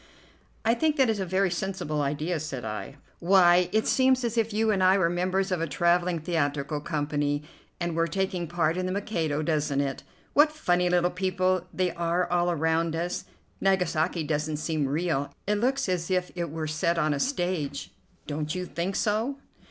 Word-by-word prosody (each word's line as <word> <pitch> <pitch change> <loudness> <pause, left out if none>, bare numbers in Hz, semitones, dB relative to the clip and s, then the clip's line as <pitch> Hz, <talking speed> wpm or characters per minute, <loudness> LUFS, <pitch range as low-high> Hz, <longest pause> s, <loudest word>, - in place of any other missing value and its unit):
"I 225 - +4
think 305 +5 +1
that 265 -5 +3
is 215 - -2
a 190 - -2
very 190 +1 +1
sensible 180 -5 -2
idea," 150 +4 -1
said 135 -6 -5
I. 110 +5 -5 0.2
"Why, 180 -1 +5
it 220 0 +2
seems 260 -1 +3
as 235 -1 -1
if 225 -1 +1
you 220 +1 +2
and 195 -2 +1
I 185 +1 +5
were 170 -3 +2
members 185 +2 0
of 180 -3 0
a 165 - 0
travelling 175 +3 +2
theatrical 150 -3 -1
company, 145 -1 -1 0.4
and 175 -2 -2
were 165 0 +2
taking 185 0 -2
part 165 0 0
in 185 0 -1
'The 185 - -2
Mikado,' 165 -7 -1
doesn't 150 -3 0
it? 140 -1 -2 0.3
What 300 +1 +5
funny 180 - +1
little 175 0 +2
people 185 -1 0
they 185 -1 0
are 170 +1 0
all 175 0 +2
around 160 0 +1
us! 175 +2 -3 0.4
Nagasaki 180 -3 +1
doesn't 150 0 -1
seem 155 -2 -1
real. 145 -1 -1
It 210 +1 +1
looks 265 +3 +1
as 180 -2 -1
if 180 -1 0
it 170 -2 -3
were 160 +1 -4
set 155 +2 0
on 155 -2 +2
a 140 - -2
stage, 175 - -2 0.3
don't 150 +2 -3
you 180 0 -3
think 180 +2 -3
so?" 225 +6 0
175 Hz, 185 wpm, -27 LUFS, 155-190 Hz, 0.4 s, Why